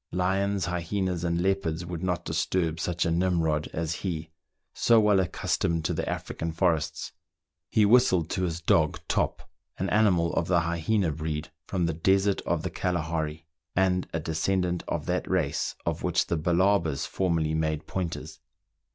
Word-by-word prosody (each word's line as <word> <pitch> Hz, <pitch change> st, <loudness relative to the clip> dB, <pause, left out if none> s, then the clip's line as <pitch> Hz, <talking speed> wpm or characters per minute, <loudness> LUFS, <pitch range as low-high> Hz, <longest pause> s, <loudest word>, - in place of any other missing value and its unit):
Lions, 95 Hz, +2 st, 0 dB
hyenas, 90 Hz, 0 st, -2 dB
and 85 Hz, -1 st, 0 dB
leopards 85 Hz, -3 st, 0 dB
would 85 Hz, -1 st, -5 dB
not 90 Hz, -2 st, -1 dB
disturb 80 Hz, +1 st, 0 dB
such 85 Hz, 0 st, -1 dB
a 85 Hz, -, +1 dB
Nimrod 85 Hz, -3 st, +1 dB
as 80 Hz, 0 st, -2 dB
he, 80 Hz, -4 st, -4 dB, 0.4 s
so 115 Hz, -1 st, +4 dB
well 105 Hz, -2 st, +4 dB
accustomed 85 Hz, -2 st, 0 dB
to -, -, +1 dB
the -, -, -2 dB
African 80 Hz, 0 st, -3 dB
forests. 80 Hz, -2 st, 0 dB, 0.6 s
He 110 Hz, -, +4 dB
whistled 100 Hz, -7 st, +4 dB
to -, -, -1 dB
his 85 Hz, -2 st, -2 dB
dog 80 Hz, -1 st, +2 dB
Top, -, -, -1 dB, 0.3 s
an 95 Hz, -, -2 dB
animal 90 Hz, -6 st, +3 dB
of 80 Hz, -, 0 dB
the 85 Hz, -2 st, +3 dB
hyena 85 Hz, +2 st, 0 dB
breed 80 Hz, 0 st, -4 dB, 0.2 s
from 90 Hz, -3 st, 0 dB
the 85 Hz, -, 0 dB
desert 95 Hz, +4 st, +2 dB
of -, -, 0 dB
Kalahari, 80 Hz, -3 st, -2 dB, 0.3 s
and 90 Hz, -1 st, +2 dB
a 80 Hz, -, -1 dB
descendant 85 Hz, +3 st, 0 dB
of -, -, -2 dB
that -, -, -1 dB
race -, -, 0 dB
of -, -, -1 dB
which -, -, +1 dB
the -, -, -1 dB
Balabas 85 Hz, -2 st, +2 dB
formerly 85 Hz, -4 st, 0 dB
made 80 Hz, -1 st, -1 dB
pointers. 90 Hz, -4 st, -4 dB
85 Hz, 155 wpm, -27 LUFS, 80-95 Hz, 0.6 s, so